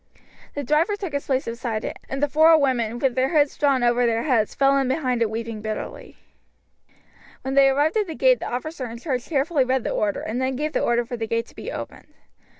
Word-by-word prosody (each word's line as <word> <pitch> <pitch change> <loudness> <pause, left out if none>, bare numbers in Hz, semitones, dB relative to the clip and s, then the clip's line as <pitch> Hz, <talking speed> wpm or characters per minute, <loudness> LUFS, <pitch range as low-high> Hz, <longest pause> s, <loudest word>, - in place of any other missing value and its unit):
The 285 - -3
driver 305 - +2
took 385 -6 -6
his 280 - -3
place 265 -1 0
beside 230 -1 -4
it, - - -5
and 270 +2 -3
the - - +4
four 315 +3 +6
women, 240 -5 0
with 260 0 +1
their 260 +1 +1
hoods 290 -1 +3
drawn 275 -4 +2
over 240 0 +3
their 230 0 0
heads, 235 -7 +1
fell 275 0 +3
in 270 - 0
behind 255 -3 0
it 225 - +2
weeping 225 0 -5
bitterly. 215 0 -6 1.3
When 265 - -3
they 275 0 +6
arrived 290 +8 +1
at 420 -2 +1
the 320 - -6
gate - - +4
the - - -5
officer 255 +2 -4
in 230 - -8
charge 255 -2 -3
carefully 290 -1 +1
read 255 -1 0
the - - -2
order, 205 -1 -1
and 235 +4 -3
then 260 0 -1
gave 300 +3 -3
the - - 0
order 240 0 +1
for 245 +1 -5
the 225 -1 -3
gate 230 +1 -1
to - - -20
be - - -6
opened. - - -9
260 Hz, 235 wpm, -23 LUFS, 235-290 Hz, 1.3 s, four